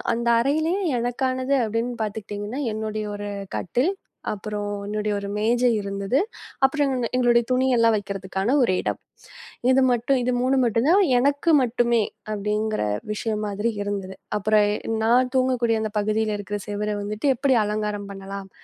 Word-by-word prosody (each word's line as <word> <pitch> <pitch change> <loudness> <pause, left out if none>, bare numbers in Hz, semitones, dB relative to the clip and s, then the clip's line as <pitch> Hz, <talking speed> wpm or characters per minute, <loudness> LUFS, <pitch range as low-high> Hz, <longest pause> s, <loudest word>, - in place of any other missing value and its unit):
அந்த 235 0 -2
அறையிலே 315 +7 +1 0.2
எனக்கானது 255 +2 0
அப்படின்னு 230 +3 -2
பாத்துக்கிட்டீங்கன்னா 210 +4 -5
என்னுடைய 215 0 -3
ஒரு 205 0 -5 0.3
கட்டில். 255 - 0 0.4
அப்புறம் 210 0 -4 0.2
என்னுடைய 210 0 -2
ஒரு 200 - -6
மேஜை 240 +3 +2
இருந்தது. 200 +6 -1 0.5
அப்புறம் 285 0 +1 0.3
எங்களுடைய 240 -1 +4
துணியெல்லாம் 250 -3 +3
வைக்கிறதுக்கான 195 +3 -2
ஒரு 185 - +2
இடம். - - -2 0.7
இது 265 +1 +5
மட்டும் 245 +3 +2
இது 250 - +1
3 265 +1 +2
மட்டும்தான் 260 - +3 0.2
எனக்கு 285 +5 +2
மட்டுமே 240 -1 +2 0.3
அப்படிங்கிற 210 +1 -1 0.3
விஷயம் 215 0 -2
மாதிரி 205 +3 -1
இருந்தது. 195 -2 -4 0.2
அப்புறம் 210 0 +3 0.4
நான் 250 +3 +3
தூங்கக்கூடிய 250 -3 +2
அந்தப் 215 -1 -3
பகுதியில 215 0 0
இருக்கிற 205 +1 -4
செவுர 210 +1 -2
வந்துட்டு 210 +6 -3
எப்படி 270 +1 +2
அலங்காரம் 210 -1 -2
பண்ணலாம். 195 0 -7
220 Hz, 130 wpm, -24 LUFS, 205-250 Hz, 0.7 s, இது